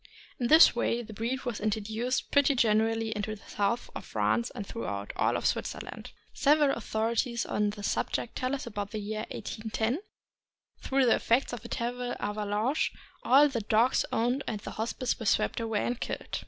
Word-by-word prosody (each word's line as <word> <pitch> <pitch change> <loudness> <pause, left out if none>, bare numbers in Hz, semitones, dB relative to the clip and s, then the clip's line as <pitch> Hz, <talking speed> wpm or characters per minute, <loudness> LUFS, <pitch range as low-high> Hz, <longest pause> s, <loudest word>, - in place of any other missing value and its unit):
In 240 - +1
this 315 +1 +8
way 240 0 0
the 220 - -10
breed 235 +5 -2
was 240 -4 -2
introduced 220 +4 -1
pretty 285 0 +4
generally 225 -1 +2
into 210 +1 -3
the 205 - -17
south 205 +4 -1
of - - -6
France 235 +1 0
and 200 - -5
throughout 105 - -5
all - - +2
of - - -5
Switzerland. - - -3 0.2
Several 295 0 +4
authorities 235 +2 -1
on 210 0 0
the 205 0 -7
subject 230 - -1
tell 255 +1 -1
us 270 - -6
that 240 - -7
about 205 -1 -4
the 215 - -4
year 215 +1 -4
1810, 220 +4 -2 0.8
through 270 0 +2
the 235 - +5
effects 245 +2 +1
of 235 -2 -6
a - - -7
terrible 245 +1 -3
avalanche, 210 +6 0 0.3
all 280 +3 +6
the 255 -5 -2
dogs 220 +4 +3
owned 245 +5 +1
at 215 -2 -3
the - - -6
Hospice 235 +3 -2
were 225 - -3
swept - - +2
away 225 -2 -1
and 245 0 -2
killed. - - -4
230 Hz, 180 wpm, -29 LUFS, 215-245 Hz, 0.8 s, this